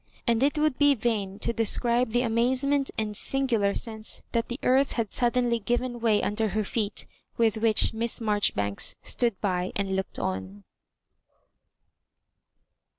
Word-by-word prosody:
And 235 Hz, -1 st, +2 dB
it 285 Hz, +3 st, +2 dB
would 300 Hz, -3 st, +1 dB
be 290 Hz, -1 st, +5 dB
vain 210 Hz, -5 st, -2 dB
to -, -, 0 dB
describe 235 Hz, +2 st, +1 dB
the 245 Hz, +2 st, +1 dB
amazement 260 Hz, +4 st, +1 dB
and 215 Hz, -2 st, -2 dB
singular 230 Hz, -6 st, +1 dB
sense 220 Hz, -1 st, -4 dB
that 230 Hz, -1 st, 0 dB
the 240 Hz, +3 st, -5 dB
earth 265 Hz, +2 st, +3 dB
had 225 Hz, -4 st, -2 dB
suddenly 240 Hz, -1 st, +1 dB
given 240 Hz, +2 st, -2 dB
way 220 Hz, -3 st, +2 dB
under 220 Hz, +2 st, 0 dB
her 215 Hz, -, +1 dB
feet, 210 Hz, 0 st, -2 dB, 0.3 s
with 225 Hz, -2 st, +2 dB
which 220 Hz, 0 st, +2 dB
Miss 230 Hz, +1 st, -1 dB
Marjoribanks 205 Hz, -, +1 dB
stood 235 Hz, -6 st, +1 dB
by 185 Hz, -2 st, -1 dB
and 195 Hz, -1 st, -1 dB
looked 190 Hz, 0 st, -3 dB
on. 95 Hz, +2 st, -4 dB
230 Hz, 145 wpm, -26 LUFS, 205-245 Hz, 0.3 s, be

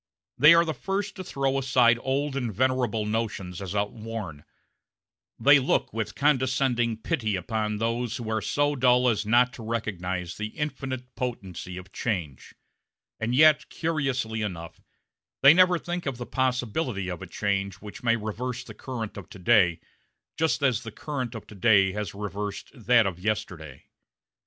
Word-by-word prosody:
They 150 Hz, +3 st, +8 dB
are 170 Hz, 0 st, +5 dB
the 160 Hz, -, -2 dB
first 195 Hz, +5 st, -3 dB
to 185 Hz, -, -5 dB
throw 135 Hz, -5 st, -1 dB
aside 125 Hz, -3 st, +4 dB
old 135 Hz, +1 st, -1 dB
and 125 Hz, -4 st, -2 dB
venerable 125 Hz, -2 st, 0 dB
notions 105 Hz, -5 st, -3 dB
as 95 Hz, 0 st, -5 dB
outworn; 105 Hz, -6 st, -4 dB, 0.9 s
they 140 Hz, 0 st, +7 dB
look 130 Hz, -, 0 dB
with 110 Hz, 0 st, -3 dB
condescending 130 Hz, -4 st, +1 dB
pity 110 Hz, -, -1 dB
upon 105 Hz, +3 st, -2 dB
those 115 Hz, +2 st, -1 dB
who 120 Hz, -, -6 dB
are 110 Hz, -1 st, 0 dB
so 145 Hz, +7 st, +1 dB
dull 125 Hz, -1 st, +4 dB
as 110 Hz, -3 st, +1 dB
not 120 Hz, +2 st, +4 dB
to 115 Hz, -, -9 dB
recognize 95 Hz, -6 st, -3 dB
the 105 Hz, 0 st, -6 dB
infinite 130 Hz, -4 st, -4 dB
potency 95 Hz, -8 st, -5 dB
of 90 Hz, +1 st, -10 dB
change; 85 Hz, -, -4 dB, 0.6 s
and 115 Hz, +2 st, -1 dB
yet, 155 Hz, +1 st, +5 dB
curiously 135 Hz, -9 st, -1 dB
enough, 85 Hz, -6 st, -6 dB, 0.6 s
they 140 Hz, +2 st, +10 dB
never 180 Hz, 0 st, +5 dB
think 175 Hz, -1 st, -4 dB
of 135 Hz, -3 st, -2 dB
the 120 Hz, -, -5 dB
possibility 125 Hz, -, -1 dB
of 90 Hz, -1 st, -5 dB
a 95 Hz, -, -7 dB
change 100 Hz, 0 st, -1 dB
which 105 Hz, 0 st, -11 dB
may 115 Hz, -1 st, +3 dB
reverse 115 Hz, +3 st, -4 dB
the -, -, -11 dB
current 115 Hz, -6 st, -6 dB
of 95 Hz, -5 st, -9 dB
to -, -, -11 dB
day 90 Hz, -4 st, +4 dB, 0.6 s
just 160 Hz, -2 st, 0 dB
as 125 Hz, -6 st, +2 dB
the 115 Hz, -, -8 dB
current 130 Hz, -2 st, -5 dB
of 110 Hz, -, -7 dB
to -, -, -13 dB
day 100 Hz, -2 st, +4 dB
has 105 Hz, -1 st, -5 dB
reversed 105 Hz, 0 st, -5 dB
that 120 Hz, -3 st, +3 dB
of 90 Hz, -3 st, -3 dB
yesterday. 90 Hz, -9 st, -4 dB
115 Hz, 160 wpm, -26 LUFS, 105-130 Hz, 0.9 s, they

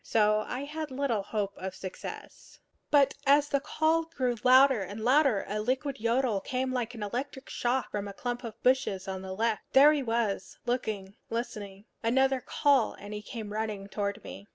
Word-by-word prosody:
So 215 Hz, -1 st, +3 dB
I 250 Hz, -, -3 dB
had 305 Hz, +1 st, -5 dB
little 260 Hz, -5 st, -1 dB
hope 200 Hz, 0 st, -2 dB
of 190 Hz, 0 st, -5 dB
success. 185 Hz, -1 st, -9 dB, 0.3 s
But 280 Hz, -2 st, +5 dB
as 290 Hz, +1 st, +5 dB
the 280 Hz, -, +2 dB
call 320 Hz, +3 st, +1 dB
grew 255 Hz, -7 st, -1 dB
louder 260 Hz, -2 st, +6 dB
and 200 Hz, +3 st, -6 dB
louder, 260 Hz, -4 st, +3 dB
a 210 Hz, +1 st, -2 dB
liquid 260 Hz, +4 st, -1 dB
yodel 230 Hz, -2 st, +1 dB
came 255 Hz, +3 st, -2 dB
like 245 Hz, -1 st, -2 dB
an 220 Hz, -, -5 dB
electric 260 Hz, +6 st, -5 dB
shock 250 Hz, +2 st, -1 dB
from 205 Hz, -1 st, -3 dB
a 200 Hz, -, -7 dB
clump 245 Hz, +3 st, -4 dB
of 230 Hz, -2 st, -7 dB
bushes 250 Hz, -8 st, +2 dB
on 190 Hz, -1 st, -4 dB
the 190 Hz, 0 st, -6 dB
left. 225 Hz, +1 st, 0 dB
There 285 Hz, +3 st, +8 dB
he 295 Hz, -, 0 dB
was, 225 Hz, -6 st, -1 dB
looking, 215 Hz, -5 st, -2 dB
listening. 205 Hz, -4 st, -5 dB, 0.2 s
Another 265 Hz, +3 st, +2 dB
call, 275 Hz, -4 st, +2 dB
and 205 Hz, +1 st, -9 dB
he 210 Hz, -, -5 dB
came 210 Hz, 0 st, -7 dB
running 215 Hz, -2 st, -3 dB
toward 205 Hz, +1 st, -3 dB
me. 200 Hz, -, -10 dB
235 Hz, 180 wpm, -29 LUFS, 205-265 Hz, 0.3 s, There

